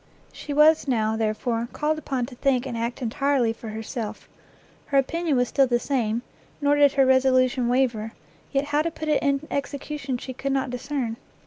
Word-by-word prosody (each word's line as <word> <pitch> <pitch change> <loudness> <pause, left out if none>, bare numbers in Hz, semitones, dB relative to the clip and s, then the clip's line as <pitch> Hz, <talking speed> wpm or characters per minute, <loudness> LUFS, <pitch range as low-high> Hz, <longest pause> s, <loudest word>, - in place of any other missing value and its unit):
She 295 - -7
was, 300 +1 +5
now, 220 -4 +1
therefore, 225 +2 -1
called 310 +1 0
upon 265 -4 -2
to 255 - -11
think 255 0 +1
and 255 -3 -4
act 235 +2 -3
entirely 245 0 +1
for 225 0 -9
herself. 220 0 -6 0.6
Her 280 - +1
opinion 310 +2 +1
was 245 -1 +1
still 275 -2 +3
the 240 -1 +2
same, 240 -4 -1 0.4
nor 285 0 +3
did 290 -1 +5
her 270 -1 +4
resolution 255 -1 +3
waver, 235 -3 0 0.4
yet 275 0 +1
how 295 +1 +1
to 330 - -1
put 315 -1 -6
it 300 - +2
in 280 +1 0
execution 280 -1 -3
she 260 +1 -7
could 275 +2 -2
not 265 -2 -1
discern. 250 -2 -3
265 Hz, 185 wpm, -25 LUFS, 235-285 Hz, 0.6 s, was